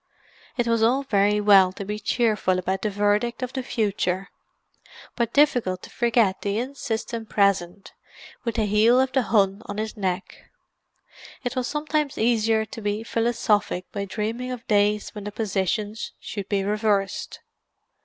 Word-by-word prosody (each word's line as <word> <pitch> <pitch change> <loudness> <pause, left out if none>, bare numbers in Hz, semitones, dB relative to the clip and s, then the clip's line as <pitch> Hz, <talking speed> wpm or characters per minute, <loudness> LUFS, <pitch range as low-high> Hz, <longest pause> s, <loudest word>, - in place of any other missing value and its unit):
It 240 - +1
was 230 -1 +1
all 250 +5 +3
very 205 -4 +2
well 195 -3 +6
to 200 - -6
be 210 +1 -4
cheerful 210 -4 +1
about 190 +1 -2
the 215 - 0
verdict 205 +4 0
of 255 - -4
the 265 - -2
future, 195 -5 -1 0.9
but 235 -2 0
difficult 240 -11 +2
to - - -11
forget 230 -5 +2
the 200 0 -1
insistent 230 -3 -4
present, 195 -2 0 0.5
with 235 -3 -2
the 220 -2 +1
heel 215 +4 +4
of 260 0 +2
the 265 - +2
Hun 200 -3 +2
on 205 - -5
his 215 0 -3
neck. 190 -2 -4 0.9
It 245 -1 -3
was 255 -1 -1
sometimes 300 -1 -1
easier 225 -1 +2
to 225 - -9
be 205 +1 -2
philosophic 225 -5 0
by 200 -1 -3
dreaming 225 +5 -3
of 245 -2 -7
days 210 0 +2
when 210 -1 -8
the 210 - -4
positions 210 +1 -2
should 200 -2 -6
be 200 -2 +1
reversed. 205 -1 -1
215 Hz, 155 wpm, -24 LUFS, 200-235 Hz, 0.9 s, well